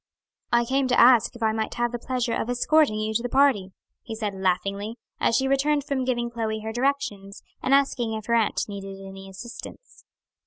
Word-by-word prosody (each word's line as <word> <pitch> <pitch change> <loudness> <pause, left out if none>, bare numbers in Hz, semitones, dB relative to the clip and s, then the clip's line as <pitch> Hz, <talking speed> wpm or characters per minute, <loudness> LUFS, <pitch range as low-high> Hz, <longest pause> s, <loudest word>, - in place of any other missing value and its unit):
"I 235 0 +3
came 265 +2 +1
to 250 - +2
ask 240 -1 +6
if 235 - -6
I 220 - +3
might 220 0 -3
have 240 -1 0
the 240 - -4
pleasure 250 -1 -2
of 230 - -2
escorting 270 0 +3
you 215 0 -2
to 225 - +1
the 245 - -3
party," 265 -8 +3 0.3
he 225 - -7
said 215 -2 -3
laughingly, 195 +4 -1 0.2
as 230 - +2
she 265 - +1
returned 285 +2 +2
from 265 -2 -2
giving 240 -2 -1
Chloe 220 -2 -3
her 220 +1 -4
directions, 235 -7 -2 0.2
and 265 - -1
asking 265 -5 +2
if 215 -1 -6
her 235 - -1
aunt 225 -2 +1
needed 195 -1 -7
any 195 0 -10
assistance. 235 - -11
235 Hz, 200 wpm, -25 LUFS, 215-260 Hz, 0.3 s, ask